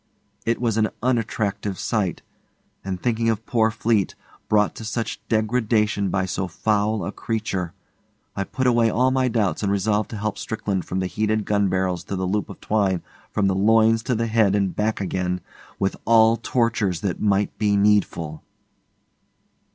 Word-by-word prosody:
It 115 - +1
was 115 -3 0
an 110 -1 +2
unattractive 105 -5 -1
sight, 105 -6 -1 0.6
and 95 -1 -4
thinking 115 +1 0
of 110 0 -1
poor 115 -2 +2
Fleete, 110 -2 0 0.3
brought 105 -1 +3
to - - -7
such 115 0 -3
degradation 110 -2 +1
by 95 0 0
so 95 0 -2
foul 105 +1 0
a - - -3
creature, 105 -6 -3 0.6
I 100 - -2
put 130 - -3
away 120 -2 +4
all 125 +4 +2
my 130 -1 +2
doubts 110 -5 0
and 100 -2 0
resolved 105 +1 +1
to 110 - -6
help 105 0 -3
Strickland 100 -4 -2
from 95 +1 -2
the - - -1
heated 110 +2 0
gun 100 -2 +2
barrels 90 -2 -1
to 100 - -4
the 95 0 -2
loop 105 +3 -1
of - - -10
twine 100 -4 0 0.3
from 105 - 0
the 95 - +3
loins 110 +3 +4
to 125 - +1
the 115 +1 0
head 110 -3 +3
and 100 -3 0
back 105 0 0
again 90 -1 -1 0.4
with 95 - 0
all 115 0 +6
tortures 115 -6 0
that 95 -4 -2
might 100 -1 +1
be 105 -1 +2
needful. 100 -6 +1
105 Hz, 170 wpm, -23 LUFS, 95-115 Hz, 0.6 s, all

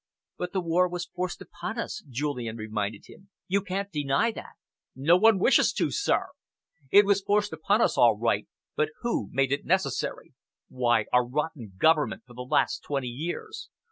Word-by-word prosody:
"But 180 0 -3
the 190 - -1
war 175 +2 +2
was 175 0 -4
forced 180 0 -5
upon 220 +2 -7
us," 230 -2 -4
Julian 125 -4 -3
reminded 105 -1 -4
him. 195 +1 -17 0.2
"You 200 +2 +1
can't 195 +1 -4
deny 145 +8 +1
that." - - -10 0.4
"No 145 +7 +4
one 220 +3 +5
wishes 215 +8 +4
to, - - 0
sir. - - 0 0.6
It 205 +6 +7
was 200 0 +3
forced 205 0 +1
upon 200 +8 +1
us - - +1
all 115 -3 +5
right, 110 -2 0 0.3
but 150 0 +1
who 235 - -1
made 135 0 +1
it 140 - 0
necessary? - - -1 0.4
Why, 120 -4 +1
our 125 0 +5
rotten 135 -6 -4
government 155 -1 +2
for 125 - -15
the 125 - -8
last 125 - +1
twenty 135 -3 -3
years! 175 - -6
155 Hz, 170 wpm, -27 LUFS, 125-195 Hz, 0.6 s, It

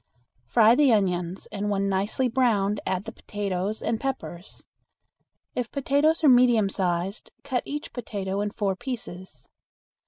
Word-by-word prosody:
Fry 220 - +6
the 275 0 +4
onions, 180 -4 0
and 205 0 -2
when 200 -1 0
nicely 200 +7 0
browned 215 -5 +1
add 190 +2 -1
the 225 - -6
potatoes 205 -1 -3
and 225 -1 0
peppers. 245 -9 -5 0.9
If 245 -2 -2
potatoes 285 +4 +2
are - - +6
medium 245 -5 +5
sized, 185 +2 -2
cut 260 -3 -1
each 295 +1 -5
potato 200 -5 -3
in 205 - -1
four 205 -2 -1
pieces. 190 -5 -7
210 Hz, 135 wpm, -26 LUFS, 195-250 Hz, 0.9 s, Fry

